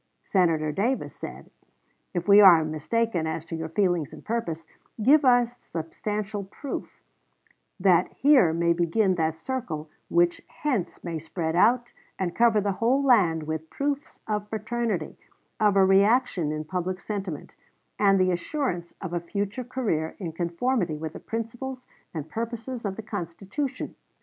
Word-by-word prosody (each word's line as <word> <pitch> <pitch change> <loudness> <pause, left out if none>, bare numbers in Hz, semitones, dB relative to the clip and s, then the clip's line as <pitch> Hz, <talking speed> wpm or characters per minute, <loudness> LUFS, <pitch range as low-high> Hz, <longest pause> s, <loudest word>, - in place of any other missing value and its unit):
Senator 165 -5 +2
Davis 230 - -1
said, - - -9 0.6
"If 175 0 -3
we 205 +1 +8
are 170 -5 +8
mistaken 165 +3 -1
as 160 0 -3
to 165 - -5
your 160 0 -4
feelings 175 -4 +1
and - - -12
purposes, 170 -9 -2 0.4
give 290 +6 +6
a 245 -2 +5
substantial 210 -1 -5
proof, 235 +8 -7 0.8
that 180 -2 +4
here 270 - +5
may 170 +1 +2
begin 175 +4 +2
that 160 -2 0
circle 160 -8 -4 0.2
which 175 0 +2
hence 245 - -3
may 170 -2 -3
spread 160 +1 -3
out 240 +6 +3 0.2
and 180 -2 -2
cover 230 -2 +4
the 200 0 0
whole 245 +8 +2
land 185 - +4
with 160 +1 -4
proofs 285 0 -3
of 210 -1 -2
fraternity, 220 -5 -2 0.4
of 210 -2 +4
a 195 -1 +6
reaction 195 - +3
in 155 0 -3
public 185 +2 -3
sentiment, 195 -8 -5 0.5
and 195 -2 +5
the 185 0 +3
assurance 175 - -2
of 185 -3 -5
a 175 - +1
future 200 +7 -3
career 220 -11 -2
in 175 -5 -4
conformity 175 +2 -1
with 155 0 -5
the - - -8
principles 245 +3 -5 0.3
and 155 -3 -5
purposes 230 +5 -5
of 195 -1 -2
the 225 - -7
Constitution." 205 - -4
195 Hz, 150 wpm, -26 LUFS, 165-230 Hz, 0.8 s, we